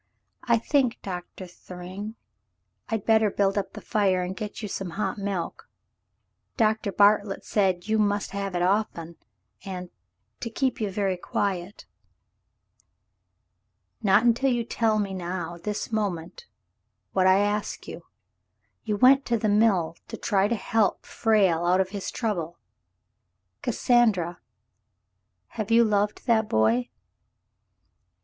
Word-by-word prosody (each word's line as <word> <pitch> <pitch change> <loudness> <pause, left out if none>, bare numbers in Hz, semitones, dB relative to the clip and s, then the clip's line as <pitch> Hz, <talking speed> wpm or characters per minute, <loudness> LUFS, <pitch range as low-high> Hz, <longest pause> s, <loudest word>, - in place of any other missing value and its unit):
"I 235 -1 +4
think. 255 +1 +1
Doctor 180 0 -6
Thryng, 185 +4 -9 0.7
I'd 220 -4 -2
better 220 -1 +4
build 195 0 +1
up 195 -2 -2
the - - -8
fire 190 -4 +1
and 180 +1 -4
get 215 +1 -6
you - - -2
some 195 -1 -4
hot 215 - -2
milk. 195 -4 -4 0.9
Doctor 220 -3 +1
Bartlett 205 0 +3
said 190 -3 +1
you 220 0 +1
must 205 -1 0
have 195 -2 -4
it 175 - +1
often 180 -4 -1 0.2
— - - -34
and 180 -2 -6 0.2
— 100 +4 -50
to 230 - -3
keep 255 +1 -1
you 210 - 0
very 195 -1 -1
quiet." 185 +1 -3 2.2
"Not 200 0 +4
until 240 +3 +3
you 240 -1 0
tell 225 -1 +1
me 200 -2 -1
now 175 -2 -4
— 170 - -20
this 210 +2 -3
moment 205 - -3 0.3
— - - -52
what 185 -1 +3
I 185 0 +6
ask 205 +1 -1
you. - - -9 0.8
You 210 -2 -1
went 270 +4 +6
to 235 - +2
the 215 -1 0
mill 200 -6 +3
to - - -7
try 200 -2 +1
to 235 - 0
help 215 -1 0
Frale 195 -7 +2
out 180 +2 +3
of 190 -1 +1
his 200 -1 -5
trouble. 175 -8 -3 1.0
Cassandra, 200 -9 +2 1.1
have 215 -1 -5
you 230 +1 +6
loved 210 -1 0
that 220 -3 +2
boy 110 +3 +2
200 Hz, 140 wpm, -26 LUFS, 185-220 Hz, 2.2 s, I